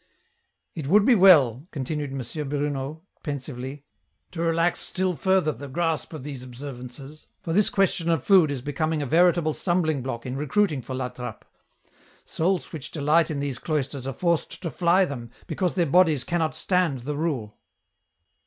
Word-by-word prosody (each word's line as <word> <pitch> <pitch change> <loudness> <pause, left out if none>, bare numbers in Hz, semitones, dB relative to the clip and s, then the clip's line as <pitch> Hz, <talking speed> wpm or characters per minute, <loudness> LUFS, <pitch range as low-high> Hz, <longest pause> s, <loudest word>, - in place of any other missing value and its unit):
" - - -50
It 155 -5 -5
would 200 +6 +5
be 255 - +6
well," 155 - +6
continued 145 0 -4
M. 135 +2 -5
Bruno, 145 +1 -3 0.2
pensively, 140 -1 -6 0.2
*' - - -48
to 165 - -5
relax 165 +1 +1
stul 185 -1 0
further 190 -3 +2
the 140 -1 -8
grasp 160 +1 -1
of 155 -5 -7
these 140 -3 -6
observances, 130 +2 -9 0.2
for 165 - -2
this 205 +3 +4
question 190 -3 +1
of 165 -5 +1
food 185 -6 +5
is 135 -4 -4
becoming 150 +2 -1
a - - -2
veritable 170 +1 +3
stumbling 160 -6 0
block 120 -2 -5
in 130 0 -4
recruitmg 150 0 0
for 130 - -5
La 130 -1 -2
Trappe; 125 -1 -8 0.8
souls 180 +2 -1
which 150 -4 -6
delight 155 +2 +2
in 150 -3 -2
these 140 -4 -3
cloisters 140 -4 -2
are 135 - -3
forced 170 +4 -1
to 165 - -3
fly 180 +3 +3
them, 120 -7 -6 0.2
because 175 -1 -1
their 175 - +2
bodies 160 -3 +4
cannot 160 +1 -1
stand 170 -6 +1
the 145 +4 -4
rule." 140 -9 -3
150 Hz, 170 wpm, -25 LUFS, 135-170 Hz, 0.8 s, be